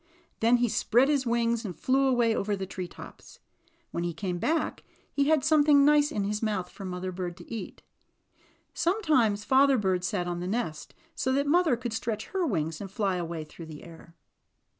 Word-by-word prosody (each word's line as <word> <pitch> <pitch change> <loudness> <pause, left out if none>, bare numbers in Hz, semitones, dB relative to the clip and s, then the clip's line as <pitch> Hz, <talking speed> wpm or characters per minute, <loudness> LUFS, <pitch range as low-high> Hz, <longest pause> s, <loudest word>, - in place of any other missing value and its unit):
Then 230 +2 +4
he 245 0 +2
spread 245 +4 +2
his 280 -4 +1
wings 235 0 +1
and 190 -6 -5
flew 270 - +2
away 240 -3 +2
over 205 0 -1
;fche 190 0 -5
tree 185 -2 -4
tops. - - -13 0.5
When 170 - -3
he 170 -2 -3
came 180 -1 -3
back 320 - -1 0.3
he 280 - +2
had 310 -3 +3
something 295 -2 +5
nice 295 0 +4
in 205 - -1
his 210 +1 -2
mouth 210 -5 -2
for 200 - -10
Mother 185 0 -4
Bird 175 -1 -5
to 175 +5 -10
eat. 225 - -7 0.9
Sometimes 300 - +1
Father 270 0 +5
Bird 190 -4 0
sat 175 0 -1
in 175 0 -3
the 180 - -4
nest 190 -7 -3 0.2
so 260 - -1
that 280 +1 +1
Mother 315 -3 +3
could 240 -2 -5
stretch 225 -1 -3
her 370 -3 -1
wings 160 - -2
and 195 - -6
fly 195 -1 -1
away 170 -2 -4
through 160 +2 -11
the 155 -2 -10
air. 165 0 -14
220 Hz, 195 wpm, -28 LUFS, 180-270 Hz, 0.9 s, something